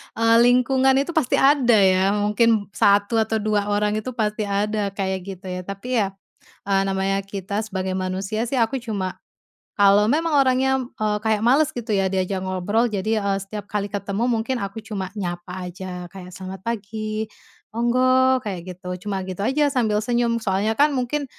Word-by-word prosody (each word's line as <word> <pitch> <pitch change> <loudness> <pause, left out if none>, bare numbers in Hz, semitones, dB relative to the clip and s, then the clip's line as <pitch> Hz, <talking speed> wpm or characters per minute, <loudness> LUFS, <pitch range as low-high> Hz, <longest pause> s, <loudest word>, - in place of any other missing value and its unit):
eee, 230 0 +3
lingkungan 255 +2 +4
itu 280 +5 +1
pasti 315 -7 +1
ada 270 -4 +4
ya, 190 0 +4
mungkin 210 0 +2
1 205 +3 +3
atau 220 0 0
2 210 -1 0
orang 210 +1 +1
itu 255 +3 -6
pasti 215 -1 -1
ada 205 +1 0
kayak 190 -1 -1
gitu 195 0 -8
ya. 180 - -4
Tapi 195 +4 -7
ya, 200 - +2 0.6
eee, 195 -1 +3
namanya 195 0 0
kita 195 0 -4
sebagai 190 -2 -3
manusia 190 +5 -2
sih, 270 - -2
aku 245 +2 +1
cuma 205 -6 -4 0.6
kalau 200 0 +5
memang 320 +6 +1
orangnya, 265 0 +3 0.2
eee, 210 -1 +1
kayak 215 -1 +2
males 270 +6 +3
gitu 240 -2 -7
ya 195 -2 +2
diajak 190 0 -1
ngobrol, 185 +5 0
jadi, 215 0 -1
eee, 200 -1 0
setiap 205 +1 -7
kali 205 -1 -2
ketemu 205 +4 -2
mungkin 235 +2 0
aku 200 +1 -5
cuma 195 -4 -4
nyapa 180 -1 -5
aja, 180 0 -7
kayak 180 -2 -10
selamat 190 +1 -8
pagi, 215 0 -3 0.5
monggo, 255 +2 +3
kayak 200 -7 -5
gitu, 180 +1 -13 0.2
cuma 195 -1 -1
gitu 185 +1 -4
aja 290 +6 +2
sambil 230 -7 +1
senyum. 235 +1 0
Soalnya 210 +1 0
kan 295 0 +5
mungkin, 265 +3 -1
210 Hz, 170 wpm, -22 LUFS, 195-240 Hz, 0.6 s, kalau